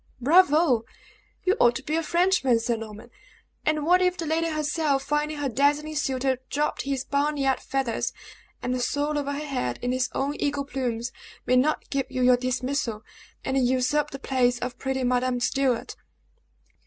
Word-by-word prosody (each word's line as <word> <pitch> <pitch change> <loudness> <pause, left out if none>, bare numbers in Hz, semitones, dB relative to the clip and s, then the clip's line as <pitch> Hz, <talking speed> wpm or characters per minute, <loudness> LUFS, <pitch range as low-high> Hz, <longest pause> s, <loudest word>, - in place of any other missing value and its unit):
"Bravo! 300 -3 +4 0.6
You 380 +2 +3
ought 240 0 +5
to 265 - -5
be 305 +2 -2
a 330 - +1
Frenchman, 340 -8 +2
Sir 235 +1 0
Norman! 220 +1 -9 0.6
And 305 -1 +1
what 360 +2 +5
if 365 0 +2
the 335 - -3
lady 325 +2 0
herself, 300 -2 0
finding 295 +1 -1
her 290 -1 -1
dazzling 290 +4 +1
suitor 265 -3 0
drop 295 +1 -1
his 275 -2 -2
barnyard 280 -1 0
feathers, 265 -4 -2 0.5
and 250 0 -1
soar 290 +4 0
over 285 -1 -1
her 290 +2 -4
head 190 - -2
in 245 - 0
his 255 0 0
own 280 +2 -1
eagle 285 -1 -1
plumes, 245 -3 -3 0.3
may 255 - +3
not 280 +5 +2
give 270 -2 -1
you 255 - -1
your 250 0 +6
dismissal, 255 -2 -2 0.4
and 265 0 +1
usurp 280 +4 +1
the 275 - -7
place 255 -2 +1
of 250 0 -5
pretty 265 -1 -2
Madame 250 0 +1
Stuart." 255 0 0
270 Hz, 165 wpm, -26 LUFS, 250-300 Hz, 0.6 s, your